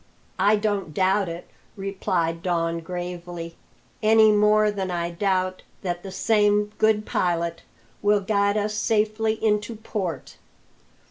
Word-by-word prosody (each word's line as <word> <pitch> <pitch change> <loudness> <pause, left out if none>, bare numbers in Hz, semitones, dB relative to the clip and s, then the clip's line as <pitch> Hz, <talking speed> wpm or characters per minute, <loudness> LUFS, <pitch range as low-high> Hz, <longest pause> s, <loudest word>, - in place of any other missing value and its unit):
"I 205 +3 +5
don't 205 -7 -2
doubt 190 0 +2
it," 170 +1 -7 0.3
replied 185 -4 -2
Don 170 -2 0
gravely, 175 -1 -6 0.5
"any 220 0 +6
more 210 0 +4
than 195 -2 -3
I 170 -1 -2
doubt 185 0 -1 0.2
that 175 -2 -2
the 195 - -8
same 210 0 +2
Good 215 -1 +3
Pilot 170 -1 -1 0.4
will 205 0 +3
guide 200 +1 +1
us 210 0 -1
safely 215 +1 +1
into 215 0 0
port. 195 - -5
195 Hz, 125 wpm, -24 LUFS, 175-210 Hz, 0.5 s, any